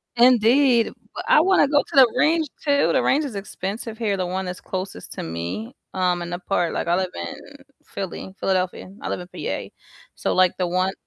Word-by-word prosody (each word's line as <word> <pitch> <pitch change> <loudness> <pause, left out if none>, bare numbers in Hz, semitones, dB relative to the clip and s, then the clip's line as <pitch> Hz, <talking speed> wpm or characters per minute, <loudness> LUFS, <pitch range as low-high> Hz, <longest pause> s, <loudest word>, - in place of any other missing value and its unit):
Indeed, 245 +1 +5 0.2
but, - - -5
I 305 - +6
wanna 370 -5 +4
go 290 0 +3
to - - -10
the 255 -4 +7
range 315 +2 +3 0.2
too, 285 -1 +3
the - - +3
range 295 +2 +2
is 240 -7 -6
expensive 205 +3 -5
here, 210 -4 0
the 185 -1 -1
one 190 +1 -3
that's 180 0 -6
closest 190 +1 -6
to - - -5
me, 85 +6 -5 0.2
um, 180 -1 +1
in 170 - -5
the 175 0 -4
part, 175 -2 0
like - - -2
I 175 - +3
live 185 -1 0
in 275 - -5 0.5
Philly, 190 -1 -6
Philadelphia. 185 -1 -1
I - - -4
live - - -2
in 180 - -8
PA, - - -4 0.5
so - - -1
like 185 -1 +4
the 180 -1 0
one 185 +2 0
190 Hz, 205 wpm, -23 LUFS, 180-255 Hz, 0.5 s, the